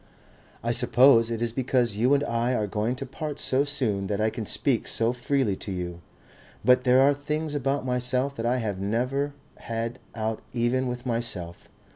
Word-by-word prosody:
"I 115 - 0
suppose 120 0 +5
it 115 0 -2
is 115 -1 -1
because 125 -3 +1
you 125 +6 +3
and 140 - +1
I 120 +1 0
are 105 - 0
going 105 +4 -1
to 135 - -5
part 145 +3 -5
so 130 +2 +2
soon 120 -10 0
that 100 0 -2
I 110 +1 +1
can 110 -2 -5
speak 130 -5 0
so 115 +1 +1
freely 125 -4 0
to 100 - -5
you.... 90 -2 -5 0.6
But 125 0 +5
there 125 +1 +5
are 140 +1 +5
things 150 +2 -3
about 140 -1 -1
myself 125 +2 +1
that 115 - -3
I 125 +2 +2
have 105 -6 -3
never 125 +8 -1 0.2
had 115 +1 -4 0.2
out 110 -1 -2
even 125 +2 +1
with 125 0 -5
myself. 115 -8 -4
120 Hz, 185 wpm, -26 LUFS, 115-135 Hz, 0.6 s, suppose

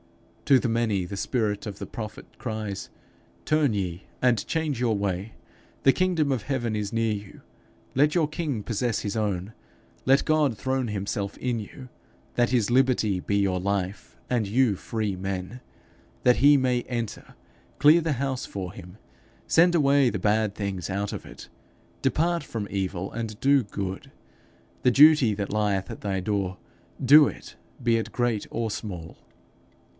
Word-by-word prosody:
To 135 -2 +6
the 125 - -1
many, 115 -5 0
the 100 - -6
spirit 105 0 -1
of 100 -3 -6
the - - -5
prophet 110 -2 -7
cries, 110 -4 -4 0.6
'Turn 150 -5 +2
ye, 90 -3 -3 0.2
and 125 -3 +2
change 155 -6 -1
your 115 -4 +2
way! 100 +1 -3 0.5
The 135 - +6
kingdom 175 -6 +1
of 130 -4 0
heaven 120 -3 -2
is 105 -1 -2
near 115 -1 +1
you. 100 -1 -8 0.5
Let 150 +4 +3
your 165 -4 +3
king 150 -8 -3
possess 115 0 -1
his 105 0 -3
own. 100 -2 -2 0.5
Let 135 +2 +4
God 150 -7 +2
throne 130 0 -1
himself 100 -1 -3
in 125 -2 -1
you, 125 +5 -9 0.5
that 120 0 +2
his 120 -5 +1
liberty 120 -7 +2
be 100 - 0
your 95 -2 +1
life, 95 -9 -3
and 120 -4 +1
you 115 0 +2
free 105 0 -3
men. 95 +5 -5 0.6
That 125 0 +5
he 145 +2 +6
may 125 -2 +1
enter, 120 -4 -5 0.4
clear 155 +4 +6
the 160 -2 0
house 135 0 -2
for 95 -2 -6
him. 90 0 -12 0.5
Send 175 +2 +5
away 140 -4 +4
the 105 - -3
bad 105 +1 +1
things 100 -4 -4
out 100 +1 -2
of - - -6
it. - - -11 0.5
Depart 170 +5 +1
from 105 -3 -5
evil, 95 -1 -2
and 110 -2 -5
do 140 -1 +4
good. 100 -2 -5 0.7
The 125 - +4
duty 145 -4 +6
that 100 0 -4
lieth 100 -3 0
at - - -8
thy 95 -2 -1
door, 95 -1 -2 0.5
do 145 +3 +8
it, - - -8 0.3
be 120 -2 +3
it 115 - -3
great 120 -4 -1
or 115 -1 -2
small.' 90 -7 -6
110 Hz, 160 wpm, -26 LUFS, 100-130 Hz, 0.7 s, do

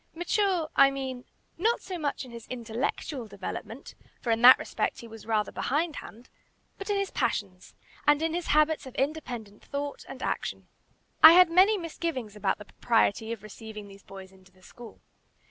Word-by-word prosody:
Mature, 350 -1 0
I 275 0 +7
mean, 265 -2 -5 0.3
not 455 +6 +1
so 365 -2 -6
much 285 -3 -3
in 250 - -13
his 235 -1 -10
intellectual 245 +2 -4
development, 205 +5 -7 0.3
for 235 - -2
in 225 0 +1
that 255 +2 +10
respect - - -3
he 235 - -10
was 225 -1 -12
rather 215 -2 0
behindhand, 290 -5 -3 0.5
but 395 - -7
in 410 - +1
his 395 -1 -2
passions, 200 -7 -3 0.3
and 295 0 +5
in 325 0 0
his 345 0 -3
habits 305 -1 +2
of 260 - -11
independent 250 -8 -4
thought 285 0 -5
and - - -8
action. - - -3 0.5
I 315 +1 +11
had 360 -1 +7
many 385 +5 +5
misgivings 320 - -4
about 200 -2 0
the 210 - -11
propriety 225 0 0
of 225 -3 -6
receiving 215 0 -10
these 195 0 -14
boys 190 -1 -12
into 190 -1 -21
the 185 0 -25
school. 235 +4 -13
255 Hz, 175 wpm, -28 LUFS, 220-315 Hz, 0.5 s, I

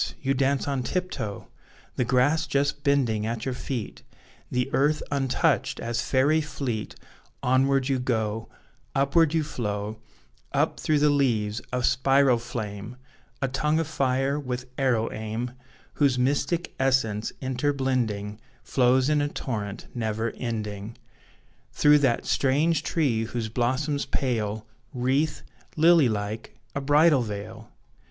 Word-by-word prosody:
You 135 0 0
dance 135 +1 +1
on 140 -2 0
tiptoe! 130 - -3 0.5
The - - +1
grass 145 +6 +2
just 140 +1 0
bending 120 -7 +2
at 115 -1 -3
your 130 - -1
feet, 125 -3 -5 0.5
The 125 0 0
earth 150 +2 +2
untouched, 135 -2 +1
as 120 +1 -2
fairy 140 +5 +2
fleet 130 -7 -4 0.5
Onward 135 +1 +3
you 135 -2 +1
go, 110 -3 -1 0.5
Upward 145 +4 +3
you 160 - +2
flow, 105 -6 -4 0.5
Up - - +1
through 155 - +2
the 145 0 +4
leaves, 115 -7 +1
a 125 0 -1
spiral 130 0 +4
flame, 110 -1 -6 0.5
A - - +2
tongue 150 +4 +1
of 165 - 0
fire, 135 -1 0
with 125 -2 -4
arrow 125 -5 +1
aim, 110 +3 -4 0.4
Whose 140 -4 +2
mystic 145 +7 0
essence 130 -6 +1
inter 130 +2 0
blending 115 -7 -1 0.2
Flows 130 0 +3
in 150 -1 +2
a 145 - +1
torrent 105 -8 -4
never 110 -1 -2
ending; 110 -2 -4 0.8
Through 150 0 +5
that 135 -5 +1
strange 145 +4 +2
tree 140 -10 0
whose 115 -1 -3
blossoms 130 +5 0
pale 110 -5 -1 0.3
Wreathe, 135 +5 0 0.4
lily 160 -4 +6
like, 105 +1 -4 0.2
a 140 - -2
bridal 145 0 +5
veil! 110 0 -6
130 Hz, 130 wpm, -26 LUFS, 115-140 Hz, 0.8 s, lily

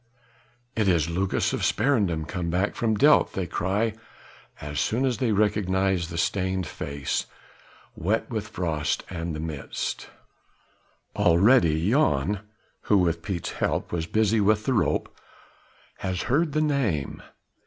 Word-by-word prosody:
"It 110 -3 +1
is 85 -3 +2
Lucas 95 +3 0
of - - -2
Sparendam 100 - +1
come 90 -1 -3
back 95 +4 0
from 110 -2 0
Delft," 150 +6 +4
they 95 - -1
cry 100 +6 -1 0.7
as 75 0 -4
soon 120 - +1
as 125 -4 0
they 125 -4 +1
recognize 95 -4 +1
the 85 - -6
stained 95 +1 0
face, 70 -2 -3 0.7
wet 105 +7 -1
with 110 -4 -3
the - - -12
frost 80 -6 -1
and 85 -2 -4
the - - -5
mist. 80 -3 -4 1.1
Already 85 -2 +4
Jan 100 - +2 0.5
who 105 - +6
with 85 -3 +1
Piet's 90 -2 -4
help - - -2
was 85 -1 -2
busy 110 +2 +2
with 105 +1 +2
the 135 - +1
rope 105 - 0 0.8
has 95 -2 -2
heard 150 +4 +1
the 155 - +2
name. 130 - -1
95 Hz, 140 wpm, -25 LUFS, 85-110 Hz, 1.1 s, who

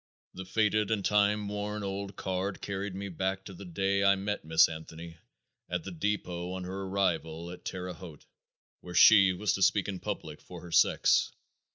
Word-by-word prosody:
The 95 - -7
faded 105 +1 +1
and 105 -3 -1
time 105 0 +2
worn 105 +1 -4
old 100 0 -4
card 95 +1 -3
carried 100 -1 -4
me 100 +1 -5
back 95 +1 -3
to 95 - -9
the 100 +2 -10
day 95 +3 0
I 100 0 +5
met 100 +1 -3
Miss 80 +1 +5
Anthony 80 +1 -9 0.5
at - - -2
the 95 - -7
depot 90 -1 -3
on 95 0 -5
her 95 +2 -5
arrival 85 -3 -1
at 90 - -11
Terre 90 -1 -5
Haute, 85 -6 -12 0.5
where 90 0 -9
she 100 -3 +8
was 95 +2 0
to 95 - -3
speak 95 0 +3
in 95 -2 -4
public 90 -6 -6
for 90 -2 -11
her 85 - -11
sex. 85 - +4
95 Hz, 185 wpm, -30 LUFS, 90-100 Hz, 0.5 s, she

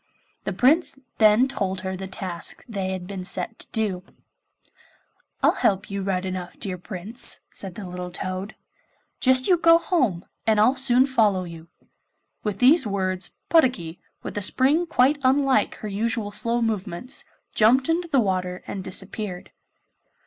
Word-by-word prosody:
The - - -1
Prince 295 +3 +3 0.2
then 215 +4 +5
told 195 -8 -3
her 190 -1 -4
the 190 +1 -6
task 185 -2 -5
they 195 -5 -3
had 185 -1 -4
been 190 -1 -6
set 185 +4 -5
to - - -8
do. 200 -5 -2 1.4
'I'll - - +6
help 195 0 0
you 200 0 -3
right 190 -1 -1
enough, 185 -1 -5
my - - -28
dear 185 -3 -4
Prince,' 200 +5 0
said 190 -3 -4
the 205 - -7
little 180 0 -6
toad; 185 +3 -5 0.6
'just 255 0 +4
you 360 - +5
go 330 0 +6
home, 255 - 0 0.2
and 215 -1 +4
I'll 240 +6 +4
soon 260 -1 +4
follow 215 -8 +2
you.' 165 -2 -10 0.8
With 210 -3 -2
these 260 +3 +5
words, 185 -2 -2
Puddocky, 245 - +2 0.2
with - - -6
a - - -6
spring 280 - +2
quite 285 -1 +3
unlike 265 -4 +2
her 215 - -7
usual 210 +1 -2
slow 230 +3 -1
movements, 215 +1 -3 0.3
jumped 245 +5 +4
into 340 +2 0
the 280 -5 +2
water 185 -4 -1
and 195 - -5
disappeared. 190 0 -3
205 Hz, 155 wpm, -24 LUFS, 185-255 Hz, 1.4 s, I'll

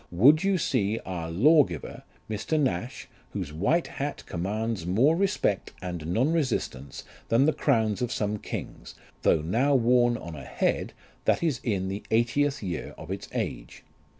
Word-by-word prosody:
Would 140 - +5
you 195 -1 +2
see 110 - 0
our 85 -3 -4
law 145 - +6
giver, 85 -5 -7 0.3
Mr. 110 +9 -1
Nash, 120 -4 -2 0.3
whose 75 - -4
white 130 - +1
hat 145 +1 -5
commands 105 +3 -2
more 115 - +3
respect 190 - 0
and 90 -4 -5
non 125 - +1
resistance 115 - -2 0.3
than 115 +4 +4
the 155 - +3
crowns 110 -7 +1
of 125 -1 -1
some 105 0 -1
kings, - - -7 0.3
though 75 - +3
now 125 - +2
worn 120 -1 +4
on 85 -6 -8
a 75 - -8
head - - -1 0.3
that - - +2
is 150 -7 +1
in 95 -5 -1
the 100 +2 -4
eightieth 125 +4 +1
year 90 -4 -4
of 80 +4 -8
its 95 - -5
age. - - -4
110 Hz, 160 wpm, -27 LUFS, 90-140 Hz, 0.3 s, law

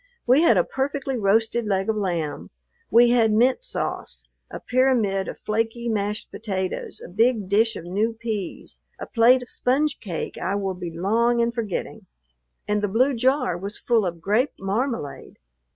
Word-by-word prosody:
We 255 +5 +5
had 235 - +5
a 175 - +4
perfectly 270 +2 -2
roasted 225 +1 +1
leg 195 -1 0
of 220 - +1
lamb; 175 -7 -3 0.4
we 240 +1 +6
had 230 -3 +4
mint 250 - +3
sauce, - - -4 0.2
a - - -7
pyramid 240 -7 +1
of - - -6
flaky 225 +2 -2
mashed 210 0 -2
potatoes, 190 -4 -4
a - - -8
big 220 +2 +1
dish 220 +3 +2
of - - -7
new 205 +6 0
peas, 220 -4 -5 0.2
a - - -5
plate 245 +2 +4
of 245 - -13
sponge 280 +3 0
cake 175 -7 -5
I 195 - -1
will 195 -2 -2
be 180 -1 -6
long 225 +8 +1
in 235 0 +2
forgetting; 230 -6 -4 0.6
and 210 0 +1
the 205 - +1
blue 250 +8 +2
jar 255 - +1
was 200 +5 -2
full 230 -3 +1
of 170 -1 -6
grape 215 - +1
marmalade. 205 - -3
225 Hz, 170 wpm, -24 LUFS, 195-240 Hz, 0.6 s, we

